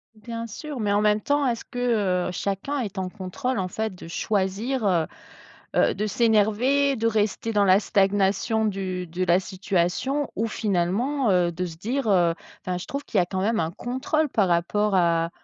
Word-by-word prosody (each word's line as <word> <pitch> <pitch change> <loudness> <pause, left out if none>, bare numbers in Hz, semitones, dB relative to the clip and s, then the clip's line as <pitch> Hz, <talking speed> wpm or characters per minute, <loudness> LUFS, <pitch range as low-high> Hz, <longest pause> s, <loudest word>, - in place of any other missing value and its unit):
Bien 230 +2 -6
sûr, 275 +5 -7
mais 205 -1 0
en 205 - +3
même 210 0 +3
temps, 285 +2 +1
est-ce 235 -2 -1
que, 215 -7 0
heu, - - -4
chacun 200 +11 -2
est 210 -5 -4
en 190 -1 -1
contrôle 215 +8 -3
en 185 -1 -2
fait, 220 +1 -3
de 175 - -11
choisir, 210 +7 -1
heu 175 -5 +2 0.7
heu, - - +3
de 210 +3 -1
s'énerver, 230 +6 +2
de 225 +1 +1
rester 220 +1 0
dans 205 -1 +4
la 190 0 +6
stagnation 200 +2 +1
du 185 -3 -3
de 175 +3 -3
la 175 +1 +4
situation 190 +9 -1
ou 225 +3 0
finalement, 215 +6 0
heu, 175 -2 +3
de 180 +2 -2
se 165 -2 -8
dire, 240 +8 -2
heu 175 -4 +3 0.3
enfin, 180 -1 -3
je 180 - -6
trouve 280 +1 -4
qu'il 205 - +1
y - - +5
a - - +1
quand 190 +1 -3
même 220 +3 +1
un 160 0 -2
contrôle 260 - -1
par 200 -6 +2
rapport 195 +4 +1
à, 170 -2 +2
205 Hz, 195 wpm, -25 LUFS, 185-230 Hz, 0.7 s, la